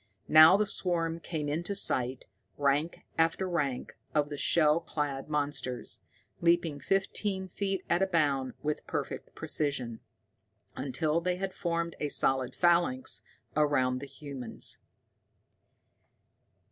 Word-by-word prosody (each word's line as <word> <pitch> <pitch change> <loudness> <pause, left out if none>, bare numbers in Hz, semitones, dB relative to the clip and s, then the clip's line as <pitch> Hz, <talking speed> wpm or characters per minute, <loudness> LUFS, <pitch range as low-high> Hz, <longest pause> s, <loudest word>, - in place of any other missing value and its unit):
Now 155 +4 +9
the 210 - +2
swarm 170 -4 -1
came 160 -3 -4
into 170 +7 -2
sight, 130 -8 +2 0.3
rank 145 +3 0
after 165 +3 +2
rank 145 -8 -2 0.2
of 145 -1 +2
the 145 - -4
shell 155 +1 +3
clad 145 -4 -3
monsters, 145 -4 -2 0.4
leaping 170 -3 +2
fifteen 195 +1 0
feet 195 0 -3
at 175 +2 +2
a 195 - +3
bound 145 -7 +1
with 150 0 -2
perfect - - -4
precision, 130 -6 -2 0.8
until 145 +5 0
they 180 +1 0
had 190 +1 -4
formed 170 -1 -2
a 150 - -1
solid 135 -2 +2
phalanx 170 -7 +2 0.3
all 155 - +3
around 130 -3 +1
the 140 - -7
humans. 135 -5 -5
155 Hz, 120 wpm, -30 LUFS, 140-175 Hz, 0.8 s, Now